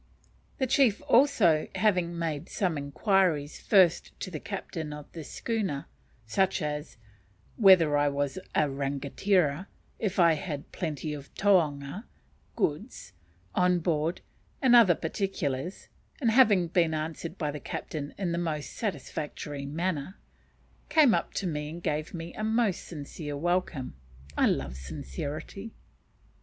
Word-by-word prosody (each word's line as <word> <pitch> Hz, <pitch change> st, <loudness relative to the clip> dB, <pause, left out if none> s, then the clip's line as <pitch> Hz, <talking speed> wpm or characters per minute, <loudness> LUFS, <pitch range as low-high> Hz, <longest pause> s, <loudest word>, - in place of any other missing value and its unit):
The 265 Hz, -, +1 dB
chief 260 Hz, -5 st, +3 dB
also, 220 Hz, -, +4 dB
having 180 Hz, -5 st, +1 dB
made 160 Hz, -4 st, -3 dB
some 180 Hz, -5 st, 0 dB
inquiries 150 Hz, +1 st, +1 dB
first 185 Hz, -5 st, +4 dB
of 185 Hz, -, -10 dB
the 155 Hz, -, -3 dB
captain 165 Hz, -5 st, -5 dB
of 150 Hz, -1 st, -10 dB
the 165 Hz, -, -7 dB
schooner 195 Hz, -6 st, -3 dB, 0.4 s
such 190 Hz, -, +1 dB
as, 150 Hz, -2 st, -4 dB, 0.6 s
whether 185 Hz, -8 st, +6 dB
I 145 Hz, 0 st, +3 dB
was 140 Hz, +3 st, -2 dB, 0.2 s
a 150 Hz, -, +4 dB
rangatira, 140 Hz, +5 st, 0 dB, 0.3 s
if 200 Hz, -3 st, -2 dB
I 170 Hz, -3 st, +6 dB
had 150 Hz, -3 st, -5 dB
plenty 155 Hz, -3 st, -3 dB
of 140 Hz, -1 st, -9 dB
taonga 170 Hz, -, +1 dB, 0.5 s
(goods) -, -, -2 dB, 0.4 s
on 180 Hz, 0 st, +3 dB
board, 165 Hz, 0 st, 0 dB, 0.4 s
and 255 Hz, -3 st, +5 dB
other 210 Hz, -8 st, +7 dB
particulars; 165 Hz, -3 st, -3 dB, 0.3 s
and 235 Hz, -6 st, +2 dB
having 215 Hz, -7 st, +5 dB
been 165 Hz, -2 st, +2 dB
answered 160 Hz, +3 st, -4 dB
by 150 Hz, -3 st, -1 dB
the 150 Hz, -, -6 dB
captain 145 Hz, -1 st, -5 dB
in 185 Hz, -4 st, -1 dB
the 170 Hz, -, -1 dB
most 155 Hz, -4 st, -3 dB
satisfactory 150 Hz, -, -4 dB
manner, 165 Hz, +2 st, -2 dB, 0.7 s
came 295 Hz, -7 st, +6 dB
up -, -, -1 dB
to 200 Hz, -, -1 dB
me 150 Hz, -3 st, -2 dB
and 170 Hz, +2 st, -8 dB
gave 150 Hz, +1 st, -1 dB
me 170 Hz, 0 st, -7 dB
a 215 Hz, -, -5 dB
most 220 Hz, -3 st, +1 dB
sincere 150 Hz, -1 st, -6 dB
welcome. 175 Hz, -, -1 dB, 0.4 s
(I -, -, +4 dB
love 65 Hz, -, -1 dB
sincerity.) 140 Hz, -, -6 dB
165 Hz, 135 wpm, -28 LUFS, 145-195 Hz, 0.7 s, other